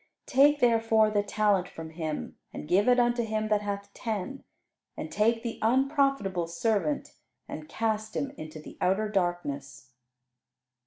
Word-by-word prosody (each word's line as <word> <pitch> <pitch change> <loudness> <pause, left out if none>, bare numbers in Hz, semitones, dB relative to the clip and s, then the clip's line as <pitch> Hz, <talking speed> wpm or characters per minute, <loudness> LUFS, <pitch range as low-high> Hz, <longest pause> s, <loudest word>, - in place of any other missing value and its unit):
Take 290 +2 +4
therefore 225 -2 +4
the 205 -1 +2
talent 205 -2 +1
from 160 -1 -8
him, 160 -2 -4 0.2
and - - -7
give 195 +7 +3
it 250 0 +5
unto 240 0 +2
him 215 -1 -2
that 210 -1 +2
hath 200 0 -5
ten; 225 +4 -4 0.5
and - - -5
take 225 +2 +2
the 230 -2 -4
unprofitable 260 - +2
servant 170 -3 -1 0.3
and 155 0 -8
cast 220 0 -2
him 275 - -1
into 155 - -9
the 155 - -12
outer 195 +4 +2
darkness." 145 - -3
210 Hz, 145 wpm, -28 LUFS, 175-230 Hz, 0.5 s, it